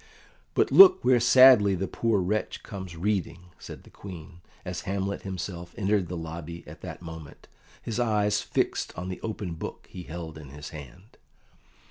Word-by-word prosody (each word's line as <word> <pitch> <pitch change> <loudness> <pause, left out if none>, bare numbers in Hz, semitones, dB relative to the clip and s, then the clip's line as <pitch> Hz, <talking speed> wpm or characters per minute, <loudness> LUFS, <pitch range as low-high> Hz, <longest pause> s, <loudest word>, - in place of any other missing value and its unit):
"But - - +2
look 380 -1 +8
where 125 -2 +5
sadly 125 -5 +7
the 95 +2 -3
poor 115 -4 0
wretch 105 +4 -2
comes 95 -4 -8
reading," 90 -2 -2
said - - -10
the - - -18
Queen, 90 -2 -11 0.2
as 90 -1 -4
Hamlet 100 +1 -3
himself 90 -2 -6
entered 100 -2 +1
the 90 +1 -5
lobby 85 +1 -7
at - - -12
that - - -8
moment, 80 -3 -10 0.4
his 115 +1 -3
eyes 105 -3 +1
fixed - - -2
on 90 +1 -5
the 90 - -6
open 105 -5 -4
book 80 - -7
he 90 - -8
held 80 -2 -8
in 70 -3 -11
his 75 +2 -9
hand. 80 - -12
95 Hz, 165 wpm, -27 LUFS, 85-105 Hz, 0.4 s, look